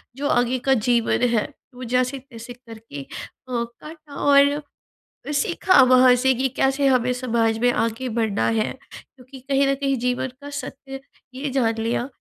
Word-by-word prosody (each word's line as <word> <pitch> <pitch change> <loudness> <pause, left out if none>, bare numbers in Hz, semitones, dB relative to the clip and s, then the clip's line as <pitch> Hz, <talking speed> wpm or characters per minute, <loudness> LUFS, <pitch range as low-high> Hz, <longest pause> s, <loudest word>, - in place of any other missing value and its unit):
जो 285 +2 -3
आगे 245 0 +1
का 270 - +5
जीवन 235 0 +1
है, 230 -2 0 0.3
वो 255 - -9
जैसे-तैसे 250 -1 -3
करके 225 - -11
अ, - - -20 0.6
काटा 300 +5 -12
और 285 +1 +4 0.7
सीखा 340 +3 +3
वहाँ 255 0 +6
से 260 +1 +2
कि 260 +2 0
कैसे 270 +1 +1
हमें 250 -2 +2
समाज 230 -3 0
में 245 +2 +3
आगे 230 +3 -2
बढ़ना 220 -3 0
है 225 -1 0 0.2
क्योंकि 260 0 -14
कहीं 275 +1 +1
न 275 - +2
कहीं 275 0 -1
जीवन 250 +2 -1
का 285 0 -9
सत्य 270 -1 -7 0.3
ये 275 +3 -4
जान 245 -4 +1
लिया 230 +3 -2
255 Hz, 155 wpm, -22 LUFS, 235-275 Hz, 0.7 s, वहाँ